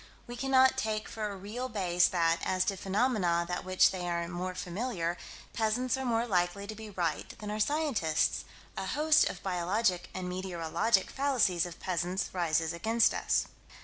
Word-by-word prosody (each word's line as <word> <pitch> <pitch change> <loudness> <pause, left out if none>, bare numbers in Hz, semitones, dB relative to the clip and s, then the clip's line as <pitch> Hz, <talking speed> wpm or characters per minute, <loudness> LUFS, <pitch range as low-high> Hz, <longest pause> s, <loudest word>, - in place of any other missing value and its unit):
We 240 - -7
cannot 265 0 +4
take 215 -3 -2
for 220 -2 -4
a 200 - -6
real 225 +7 -5
base 180 -6 +2
that, 165 -2 +1
as 185 -1 +1
to 195 - 0
phenomena 190 -4 +1
with 180 - -3
which 185 0 +4
they 180 -2 -4
are 170 0 -1
more 180 +1 -4
familiar, 180 -2 -2 0.4
peasants 225 +3 +1
are 265 - -4
more 235 -2 +1
likely 185 -1 0
to 215 - -6
be 220 0 -9
right 175 -5 -2
than 210 -1 -6
are 210 - -3
scientists: 255 - +1 0.3
a 190 - -4
host 305 +7 +3
of 180 - -8
biologic 180 0 0
and 185 -1 -4
meteorologic 185 +2 0
fallacies 240 -11 +1
of 170 - -10
peasants 180 +1 -2
rises 165 -2 0
against 225 +7 +2
us. - - +1
190 Hz, 170 wpm, -30 LUFS, 175-230 Hz, 0.4 s, cannot